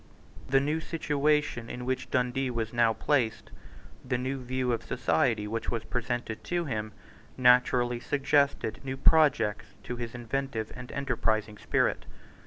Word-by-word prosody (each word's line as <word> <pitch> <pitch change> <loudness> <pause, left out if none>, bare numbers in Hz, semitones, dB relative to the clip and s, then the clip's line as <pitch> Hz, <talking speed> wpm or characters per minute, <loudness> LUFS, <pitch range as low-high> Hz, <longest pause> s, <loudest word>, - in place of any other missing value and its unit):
The 135 +1 +5
new 150 +4 0
situation 150 -5 0
in 125 0 -6
which 130 0 -2
Dundee 130 +1 0
was 115 -2 -3
now 120 -1 +4
placed, 120 -1 0 0.5
the 125 - -1
new 130 +2 -3
view 130 0 -1
of 115 - -1
society 110 0 +1
which 115 +1 -3
was 115 -2 -2
presented 120 -2 -3
to 175 -1 -1
him, 110 -5 -3 0.5
naturally 125 -1 +4
suggested 140 -4 +1
new 135 0 -4
projects 145 -9 +3
to 125 - -5
his 120 -1 -5
inventive 120 -2 -3
and 125 0 -9
enterprising 110 -6 -1
spirit. - - 0
125 Hz, 140 wpm, -29 LUFS, 115-135 Hz, 0.5 s, The